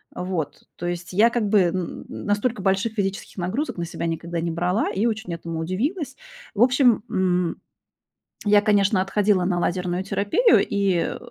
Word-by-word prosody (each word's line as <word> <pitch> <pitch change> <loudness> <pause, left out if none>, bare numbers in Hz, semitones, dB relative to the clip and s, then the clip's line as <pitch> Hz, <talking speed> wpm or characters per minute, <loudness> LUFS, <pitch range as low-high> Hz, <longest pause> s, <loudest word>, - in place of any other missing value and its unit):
вот. 180 -4 -4
То 175 - -5
есть 175 +1 -5
я 220 +5 +5
как 235 -3 -1
бы 210 -1 +5
н 175 0 -2
настолько 205 +2 -1
больших 195 +3 +1
физических 195 -2 -3
нагрузок 190 - -2
на 170 - -2
себя 170 - -5
никогда 170 0 -3
не 170 - -2
брала 180 +6 0
и 200 +4 0
очень 215 -6 -3
этому 165 -1 -5
удивилась. 265 - -2 0.4
В 215 - -2
общем, 250 -3 +4
м, 180 -2 0 0.8
я, 205 -1 +5
конечно, 205 -2 +3
отходила 195 -1 +2
на 180 -1 0
лазерную 180 +1 -1
терапию, 205 - +3
и 195 -4 0
190 Hz, 160 wpm, -23 LUFS, 175-215 Hz, 0.8 s, я